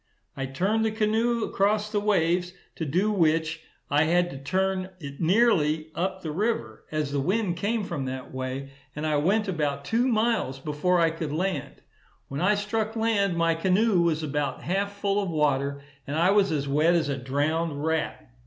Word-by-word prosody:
I 135 -1 -3
turned 195 +11 0
the 220 - +2
canoe 220 +2 +1
across 210 +1 +1
the 210 - +1
waves, 180 -3 +1 0.2
to 160 - -3
do 185 +9 +1
which, 160 -3 +1 0.3
I 145 +2 +3
had 175 +2 +2
to 135 - -7
turn 185 +5 -1
it 140 -2 -8
nearly 160 -5 +3
up 190 +2 -2
the 160 - -3
river, 160 - -2
as 155 -2 -1
the 140 - 0
wind 185 +4 0
came 215 +3 0
from 170 -8 -4
that 130 0 -6
way; 130 +1 -4 0.2
and 150 +1 -3
I 155 -1 +2
went 200 +8 +2
about 145 -6 -1
two 235 - +1
miles 225 - +1
before 150 +6 0
I 165 -1 +3
could 160 -2 -4
land. 155 -4 -3 0.5
When 140 +3 -4
I 205 +4 +4
struck 215 +2 -2
land, 205 -5 +1
my 165 0 +3
canoe 185 +3 +2
was 160 -2 +1
about 150 -1 -2
half 200 +3 -1
full 200 0 0
of 195 - -3
water, 140 -3 0 0.2
and 140 - -3
I 175 +4 +4
was 200 -3 +3
as 145 -3 -1
wet 155 +5 +3
as 165 -4 +1
a 140 - -1
drowned 145 +3 -1
rat. 160 -1 -2
170 Hz, 185 wpm, -26 LUFS, 150-200 Hz, 0.5 s, I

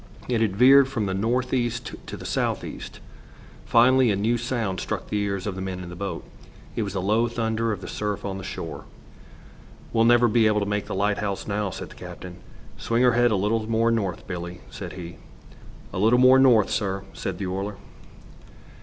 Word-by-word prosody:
It 120 -3 0
had 105 -4 +1
veered 135 +4 +7
from 115 -5 -2
the 95 - -2
north 120 +6 0
east 120 -1 -1
to - - -6
the - - -10
south - - -1
east. - - -8 0.7
Finally, 125 +1 +5
a 100 - +2
new 110 +4 +1
sound 115 -5 -2
struck - - -4
the 105 - 0
ears 100 -2 -2
of 100 - -2
the 95 - -6
men 95 -1 -4
in 90 - -8
the 90 - -8
boat. 100 +2 -5 0.5
It - - -1
was 100 -3 -3
the 95 - -2
low 110 +4 +2
thunder 115 -1 -1
of 100 -3 -4
the - - -7
surf 105 -1 -3
on 95 -1 -4
the - - -8
shore. - - -6 1.1
"We'll 115 0 +4
never 120 +1 +5
be 115 0 +4
able 105 0 +2
to 100 - -1
make 105 0 -2
the - - -4
lighthouse 100 0 -1
now," 105 -1 -1
said - - -7
the - - -14
captain. 90 -1 -9 0.4
"Swing 115 +2 +1
her 125 -1 +5
head 120 +1 +4
a 110 - +1
little 110 +3 0
more 115 +1 +2
north, 100 -6 -2
Billie," 90 -1 -6
said - - -7
he. 85 -2 -8 0.8
"'A - - -3
little 110 +5 +4
more 130 +1 +7
north,' 120 -6 +5
sir," 95 -3 -1
said 95 -2 -4
the 95 - -4
oiler. 95 +3 -3
105 Hz, 205 wpm, -25 LUFS, 95-120 Hz, 1.1 s, veered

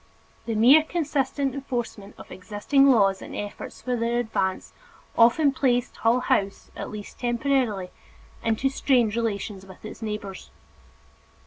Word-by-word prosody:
The 225 - -1
mere 255 +8 +7
consistent 285 -4 -1
enforcement 240 -7 -5
of - - -13
existing 215 +9 +2
laws 195 -6 +4
and - - -8
efforts 205 0 -7
for 250 -1 -1
their 235 0 0
advance 220 -5 -2 0.4
often 260 +6 +5
placed 250 -2 0
Hull 235 +2 +2
House, 200 -5 -1
at - - -6
least 210 -1 -9
temporarily, 240 -6 0 0.5
into 225 +4 +1
strained 250 -5 +2
relations 205 -4 -3
with 190 +1 -14
its - - -9
neighbors. 210 -3 -6
235 Hz, 130 wpm, -25 LUFS, 205-265 Hz, 0.5 s, mere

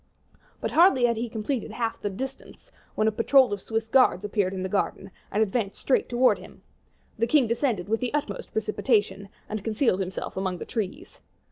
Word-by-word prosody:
But - - -2
hardly 325 -8 +5
had 235 -1 +2
he 235 +1 -3
completed 225 +3 -3
half 225 +1 -3
the 205 - -1
distance 265 +8 -8 0.2
when 215 - +2
a - - +3
patrol 245 +1 +4
of 200 - -4
Swiss 225 +2 -2
guards 225 -5 +3
appeared 205 -2 0
in 190 -1 -4
the - - -1
garden, 195 0 -2 0.2
and 215 +2 +2
advanced 205 -1 -2
straight 270 - +1
towards 250 +1 +3
them. - - -15 0.6
The 230 - +2
king 280 +1 +4
descended 230 -5 -1
with 225 +2 0
the 250 - -2
utmost 285 -10 -3
precipitation, 210 -2 0 0.2
and 215 -2 -5
concealed 220 -2 +1
himself 190 -1 -4
among 190 -1 -2
the - - -7
trees. 225 - -5
220 Hz, 190 wpm, -26 LUFS, 200-245 Hz, 0.6 s, hardly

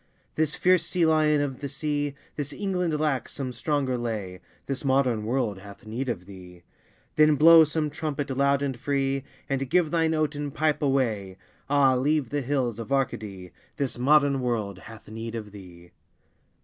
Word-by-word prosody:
This 155 -1 0
fierce 180 -1 +3
sea 175 -2 +1
lion 155 -2 +3
of 135 -3 -3
the 140 - -5
sea, 145 0 -2 0.2
This 145 -1 -4
England 180 -6 -1
lacks 150 -4 -1
some 130 -2 -4
stronger 135 -2 -1
lay, 105 -6 -4 0.3
This 135 0 -4
modern 130 -5 +1
world 115 -4 -1
hath 100 +1 -13
need 120 +5 -4
of 95 -6 -4
thee! 90 -2 -13 0.5
Then 155 0 +6
blow 165 +2 +8
some 150 0 -2
trumpet 145 -2 -3
loud 140 +1 +2
and 135 -2 -1
free, 135 0 -1 0.2
And 135 -1 -2
give 170 -2 +2
thine 160 -1 +2
oaten 150 -2 -1
pipe 155 +2 0
away, 115 -9 0 0.3
Ah, 140 -2 +4
leave 140 0 +1
the 145 0 0
hills 125 -4 -1
of 115 +3 -7
Arcady! 105 -9 -2 0.3
This 135 -4 -2
modern 140 0 +4
world 110 -6 -2
hath 110 -1 -13
need 115 +1 -6
of 105 -2 -6
thee! 90 -3 -13
135 Hz, 165 wpm, -26 LUFS, 115-150 Hz, 0.5 s, blow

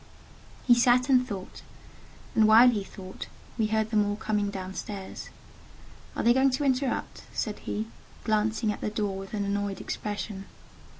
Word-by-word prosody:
He 245 - +7
sat 245 +2 +4
and 255 -1 +4
thought, 195 -5 -7 0.7
and 220 -1 +5
while 230 +3 +8
he 210 -4 -2
thought, 190 -1 -9 0.3
we 220 -3 +1
heard 220 0 0
them 215 -2 +4
all 205 0 -1
coming 210 -1 -1
down 190 -1 -5
stairs. 195 -1 -6 0.9
"Are - - -1
they 235 - +6
going 265 +2 +4
to 295 - -2
interrupt?" 265 -1 -1
said 215 -2 -2
he, 215 +1 -3 0.4
glancing 215 0 +1
at - - -6
the - - -1
door 210 -2 -2
with 195 +2 -6
an 205 -1 -1
annoyed 200 0 -2
expression. 205 -1 -4
215 Hz, 165 wpm, -28 LUFS, 205-235 Hz, 0.9 s, while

